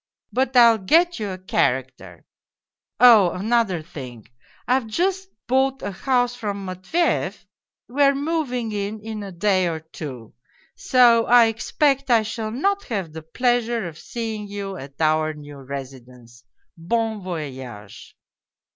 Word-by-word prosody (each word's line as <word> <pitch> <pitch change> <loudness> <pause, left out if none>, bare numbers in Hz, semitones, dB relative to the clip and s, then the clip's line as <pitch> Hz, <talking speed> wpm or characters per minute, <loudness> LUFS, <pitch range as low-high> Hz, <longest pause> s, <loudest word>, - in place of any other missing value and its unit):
But 260 0 +1
I'll 230 -2 +7
get 335 - +3
you 210 -2 -3
a 185 - -5
character 125 - -2 0.7
Oh, 225 -6 +7
another 200 -4 0
thing: 130 - -10 0.4
I've 255 -2 +1
just 375 - -1 0.2
bought 265 +1 +1
a 205 - -3
house 245 +4 0
from 205 -5 -5
Matveyev. 185 - -1 0.4
We 270 +4 -2
are 280 0 +5
moving 275 -6 -2
in 205 +1 -3
in 215 0 -6
a 200 -1 -7
day 185 0 +1
or 165 -2 -3
two. 140 -7 -9 0.4
So 235 -3 +4
I 240 -1 +7
expect 270 +5 0
I 230 -2 +4
shall 220 0 -4
not. 395 - -1
have 195 - -4
the 160 - -7
pleasure 235 +4 0
of 155 -2 -10
seeing 220 -3 -5
you 200 -1 -6
at 140 -4 -11
our 155 0 +1
new 145 -1 -11
residence. 125 -3 -10 0.3
Bon 220 +5 -2
voyage 130 - -8
210 Hz, 140 wpm, -22 LUFS, 155-245 Hz, 0.7 s, I'll